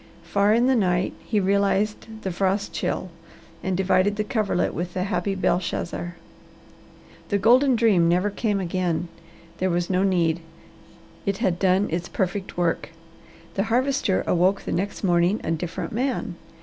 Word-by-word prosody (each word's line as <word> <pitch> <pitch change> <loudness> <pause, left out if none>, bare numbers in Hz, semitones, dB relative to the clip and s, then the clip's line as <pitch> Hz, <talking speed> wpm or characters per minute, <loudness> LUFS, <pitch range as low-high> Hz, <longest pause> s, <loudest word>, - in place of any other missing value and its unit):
Far 200 +1 +2
in 235 +3 +4
the 260 0 +4
night 180 -4 +1
he 215 - -1
realized 200 +2 +1 0.2
the 190 - -2
frost 195 +3 -1
chill 185 - -2 0.5
and 185 -1 -1
divided 190 +1 +2
the 215 - -1
coverlet 210 -6 0
with 175 +1 -4
the 185 - 0
happy 195 0 -1
Belshazzar. 175 -1 -1 1.1
The 205 - +2
golden 250 +6 +5
dream 205 -8 +4
never 180 +4 +2
came 205 -1 -1
again. 175 -2 -1 0.5
There 185 - +1
was 175 +1 0
no 185 0 +2
need. 175 -4 +2 0.9
It 200 -1 +1
had 175 -2 0
done 190 +1 +3
its 175 +1 -2
perfect 190 -1 -3
work. 170 -2 0 0.6
The 195 - 0
Harvester 250 -3 +1
awoke 185 +3 +2
the - - -4
next 200 +4 -2
morning 175 +2 +3
a - - -2
different 165 +1 -3
man. 240 -4 -1
190 Hz, 150 wpm, -24 LUFS, 175-205 Hz, 1.1 s, golden